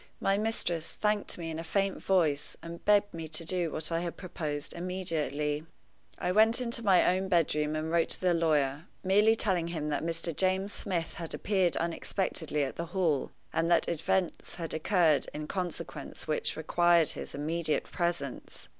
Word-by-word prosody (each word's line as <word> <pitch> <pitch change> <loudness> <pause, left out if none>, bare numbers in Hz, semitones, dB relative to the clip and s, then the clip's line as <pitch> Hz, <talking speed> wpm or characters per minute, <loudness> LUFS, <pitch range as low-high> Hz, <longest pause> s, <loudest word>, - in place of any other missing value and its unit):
My 195 - +2
mistress 200 -6 -1
thanked 210 -1 0
me 165 -2 -5
in 160 - -5
a - - -4
faint 195 +3 -1
voice, 155 -7 +1
and 170 0 -8
begged 205 -1 +4
me 165 -1 -5
to 160 +2 +1
do 175 -1 +1
what 155 +1 -4
I 165 - +1
had 170 0 -4
proposed 155 -5 -4
immediately. 155 -5 -2 0.5
I 180 - -1
went 220 +4 +5
into 235 -1 +1
my 195 -4 +5
own 190 +1 -2
bedroom 155 -4 +1
and 155 +1 -2
wrote 170 -1 +2
to - - 0
the 180 -1 +2
lawyer, 155 -1 +1 0.2
merely 205 +4 +4
telling 185 -7 +1
him 155 -3 -3
that 145 - -1
Mr. 165 -1 -3
James 190 +3 +1
Smith 175 -4 -2
had 170 -4 -3
appeared 190 -4 +1
unexpectedly 165 -2 -1
at 135 - -4
the 170 - -3
Hall, 160 -7 +1 0.2
and 165 +1 +1
that 170 - +3
events 170 +2 -1
had 165 -2 -5
occurred 160 -2 +2
in 150 0 -4
consequence 180 -1 -5
which 155 - -1
required 170 0 +4
his - - -5
immediate 155 +2 0
presence. 170 -6 -4
170 Hz, 170 wpm, -30 LUFS, 155-185 Hz, 0.5 s, went